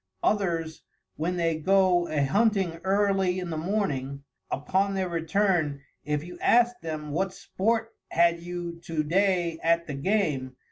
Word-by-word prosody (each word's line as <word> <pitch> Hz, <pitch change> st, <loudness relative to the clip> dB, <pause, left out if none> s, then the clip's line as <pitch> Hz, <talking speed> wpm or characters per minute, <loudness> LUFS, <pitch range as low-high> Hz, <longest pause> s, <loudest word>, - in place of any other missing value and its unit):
Others, 170 Hz, -6 st, 0 dB, 0.3 s
when 170 Hz, +4 st, -1 dB
they 165 Hz, -2 st, 0 dB
go 185 Hz, 0 st, +3 dB
a 145 Hz, -2 st, +1 dB
Hunting 195 Hz, -1 st, +1 dB
early 195 Hz, -1 st, +2 dB
in 180 Hz, -2 st, -4 dB
the -, -, -2 dB
morning, 150 Hz, -7 st, -2 dB, 0.3 s
upon 190 Hz, +7 st, 0 dB
their 190 Hz, -1 st, 0 dB
return, 165 Hz, -4 st, 0 dB, 0.2 s
if 150 Hz, +1 st, -1 dB
you 175 Hz, +1 st, -10 dB
ask 240 Hz, +1 st, +3 dB
them 155 Hz, -2 st, -5 dB
what 190 Hz, +5 st, -1 dB
sport 225 Hz, +4 st, -1 dB, 0.2 s
had 170 Hz, 0 st, +3 dB
you 175 Hz, -1 st, -6 dB
to 160 Hz, -2 st, -1 dB
day 175 Hz, 0 st, +1 dB
at 170 Hz, 0 st, +2 dB
the 145 Hz, -, -5 dB
Game? 140 Hz, -5 st, 0 dB
175 Hz, 145 wpm, -27 LUFS, 160-195 Hz, 0.3 s, go